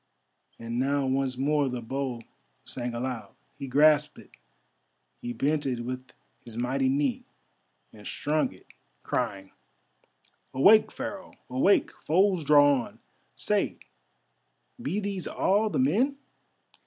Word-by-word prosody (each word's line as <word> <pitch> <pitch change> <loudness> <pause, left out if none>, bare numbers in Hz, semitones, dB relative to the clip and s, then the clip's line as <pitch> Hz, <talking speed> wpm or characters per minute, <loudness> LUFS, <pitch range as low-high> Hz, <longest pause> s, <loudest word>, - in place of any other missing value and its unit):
And 115 +1 -4
now 140 +1 +1
once 130 -1 0
more 145 +1 +1
the 125 -1 -4
bow 130 0 -3 0.4
sang 120 -1 -4
aloud. 120 -4 -5 0.2
He 135 - -7
grasped 150 +2 +4
it, - - -15 0.9
he 120 - -4
bent 145 +5 0
it 125 -3 -2
with 130 +1 -5 0.4
his 115 -1 -10
mighty 130 +2 0
knee, 140 -1 0 0.7
and 105 -1 -11
strung 150 +1 0
it, - - -17 0.4
crying: 95 -1 -3 1.0
"Awake, 205 +11 +6
Pharaoh, 195 -2 -7 0.2
awake! 135 +11 +3
Foes 185 +1 +1
draw 145 -2 +5
on. - - -17 0.4
Say, - - 0 1.0
be 180 +9 -2
these 200 -3 -4
all 210 +3 +1
the - - -2
men?" 265 +1 +2
140 Hz, 120 wpm, -27 LUFS, 125-155 Hz, 1.0 s, Awake